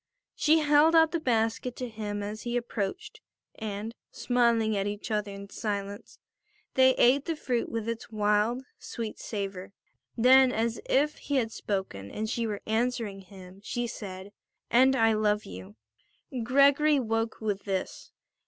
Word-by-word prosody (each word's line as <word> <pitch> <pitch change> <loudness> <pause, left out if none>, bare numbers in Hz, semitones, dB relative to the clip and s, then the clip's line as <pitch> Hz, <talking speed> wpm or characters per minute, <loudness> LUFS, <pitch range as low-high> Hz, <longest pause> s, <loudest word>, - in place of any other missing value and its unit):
She 310 +1 +3
held 300 +2 +5
out 320 -1 +6
the 335 - -1
basket 230 -2 0
to 250 - -4
him 210 -2 -5
as 210 +1 -5
he 240 0 -2
approached, 245 - -4 0.3
and, 215 0 -5 0.2
smiling 235 -3 +1
at 200 0 -1
each 205 +3 -5
other 210 -1 -1
in 200 0 -9
silence, 205 -1 -5 0.6
they 260 0 +5
ate 265 +3 +4
the 330 - -2
fruit 245 -5 -2
with 230 -1 -4
its 230 0 -4
wild, 210 +4 +1 0.2
sweet 225 -2 -6
savour. 195 -2 -5 0.4
Then, 260 +2 +6
as 230 0 -1
if 295 +3 +2
he 285 - -3
had 230 -4 +1
spoken 190 - -4
and 215 - -4
she 230 0 -1
were 205 -2 -5
answering 225 -2 -1
him, 190 0 -13
she 240 +2 -2
said: 195 -4 -7 0.4
"And 260 +2 +5
I 225 -2 +4
love 210 -1 +1
you." 95 +2 -10 0.7
Gregory 280 +4 +4
woke 225 -2 -2
with 205 -3 -3
this. 190 -2 -4
225 Hz, 155 wpm, -28 LUFS, 205-250 Hz, 0.7 s, out